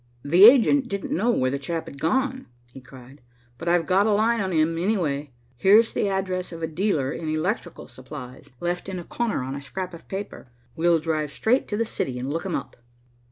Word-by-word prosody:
"The 175 Hz, +8 st, +7 dB
agent 260 Hz, +2 st, +6 dB
didn't 200 Hz, -4 st, -3 dB
know 215 Hz, +8 st, +1 dB
where 130 Hz, -, +2 dB
the 140 Hz, -, -2 dB
chap 165 Hz, +3 st, -4 dB
had 140 Hz, -, -11 dB
gone," 260 Hz, -, 0 dB, 0.3 s
he 135 Hz, -, -11 dB
cried, 130 Hz, +1 st, -15 dB, 0.4 s
"but 170 Hz, -, -2 dB
I've 170 Hz, -1 st, +2 dB
got 195 Hz, +3 st, +3 dB
a -, -, +3 dB
line 225 Hz, +2 st, +2 dB
on 190 Hz, -1 st, -2 dB
him, 160 Hz, 0 st, +2 dB
anyway. 165 Hz, -7 st, -1 dB, 0.3 s
Here's 210 Hz, -, +5 dB
the 205 Hz, -, 0 dB
address 185 Hz, -2 st, -2 dB
of 165 Hz, -1 st, -8 dB
a -, -, 0 dB
dealer 160 Hz, -5 st, 0 dB
in 160 Hz, 0 st, -5 dB
electrical 175 Hz, +3 st, -3 dB
supplies, 130 Hz, -1 st, -11 dB
left 175 Hz, +2 st, -3 dB
in 190 Hz, -, -4 dB
a 175 Hz, -, -6 dB
corner 230 Hz, -, -2 dB
on 130 Hz, +1 st, -5 dB
a 140 Hz, -, -6 dB
scrap 180 Hz, +6 st, -6 dB
of 170 Hz, -, -12 dB
paper. 195 Hz, -8 st, -6 dB, 0.3 s
We'll 170 Hz, +1 st, +3 dB
drive 155 Hz, -2 st, -2 dB
straight 245 Hz, -, +1 dB
to 210 Hz, -, -3 dB
the 230 Hz, -, +1 dB
city 130 Hz, -, -3 dB
and 130 Hz, +3 st, -4 dB
look 165 Hz, +4 st, -3 dB
him 180 Hz, -, -2 dB
up." 135 Hz, -, -6 dB
175 Hz, 210 wpm, -24 LUFS, 150-205 Hz, 0.4 s, The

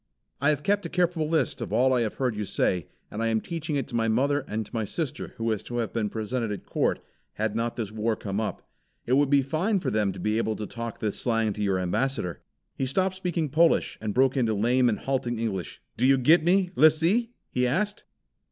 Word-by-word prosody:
I 145 Hz, -, +4 dB
have 150 Hz, -1 st, 0 dB
kept 205 Hz, 0 st, +1 dB
a -, -, -13 dB
careful 175 Hz, -3 st, 0 dB
list 160 Hz, -1 st, 0 dB
of -, -, -4 dB
all 130 Hz, +4 st, +3 dB
I 125 Hz, -, +2 dB
have 110 Hz, -2 st, -2 dB
heard 125 Hz, -4 st, -1 dB
you 105 Hz, -, -2 dB
say, 90 Hz, -3 st, 0 dB, 0.2 s
and 105 Hz, -, -4 dB
I 115 Hz, -, +1 dB
am 110 Hz, -1 st, +2 dB
teaching 160 Hz, +2 st, -4 dB
it 140 Hz, -, -1 dB
to 120 Hz, -, -5 dB
my 115 Hz, -1 st, +1 dB
mother 140 Hz, +6 st, +2 dB
and 110 Hz, +1 st, -3 dB
to -, -, -19 dB
my 115 Hz, -2 st, -1 dB
sister 145 Hz, -, -4 dB
who 115 Hz, -, -5 dB
was 110 Hz, -3 st, 0 dB
to 120 Hz, -, -5 dB
have 115 Hz, -2 st, -2 dB
been 110 Hz, -3 st, 0 dB
presented 115 Hz, +1 st, -2 dB
at 100 Hz, -, -6 dB
Court, -, -, 0 dB, 0.4 s
had 110 Hz, 0 st, -2 dB
not 115 Hz, +1 st, -1 dB
this 110 Hz, -4 st, -4 dB
war 110 Hz, +1 st, 0 dB
come 100 Hz, 0 st, -3 dB
up. 110 Hz, -, -4 dB, 0.4 s
It 125 Hz, -, 0 dB
would 140 Hz, +1 st, +4 dB
be 140 Hz, -1 st, +4 dB
fine 180 Hz, +10 st, 0 dB
for -, -, -2 dB
them 105 Hz, -2 st, +1 dB
to -, -, -9 dB
be 105 Hz, +1 st, 0 dB
able 110 Hz, -1 st, 0 dB
to 105 Hz, -, -5 dB
talk 115 Hz, +1 st, -6 dB
this 105 Hz, -2 st, -2 dB
slang 115 Hz, -3 st, +1 dB
to 105 Hz, -, -6 dB
your 100 Hz, -2 st, +1 dB
ambassador." 90 Hz, -, -1 dB, 0.3 s
He 130 Hz, -, -1 dB
stopped 185 Hz, +7 st, +1 dB
speaking 175 Hz, -5 st, -2 dB
Polish, 165 Hz, +4 st, +2 dB
and 105 Hz, -2 st, -3 dB
broke 130 Hz, +1 st, +4 dB
into 115 Hz, -5 st, +1 dB
lame 120 Hz, +4 st, +3 dB
and 110 Hz, -, 0 dB
halting 125 Hz, -3 st, -2 dB
English. 100 Hz, -6 st, -3 dB, 0.2 s
"Do 125 Hz, -, +3 dB
you 135 Hz, 0 st, +5 dB
get 155 Hz, +6 st, +5 dB
me, 180 Hz, +1 st, +3 dB
Lissee!" 165 Hz, +10 st, +4 dB, 0.2 s
he 125 Hz, 0 st, +1 dB
asked. 205 Hz, -, -1 dB
120 Hz, 235 wpm, -26 LUFS, 110-150 Hz, 0.4 s, you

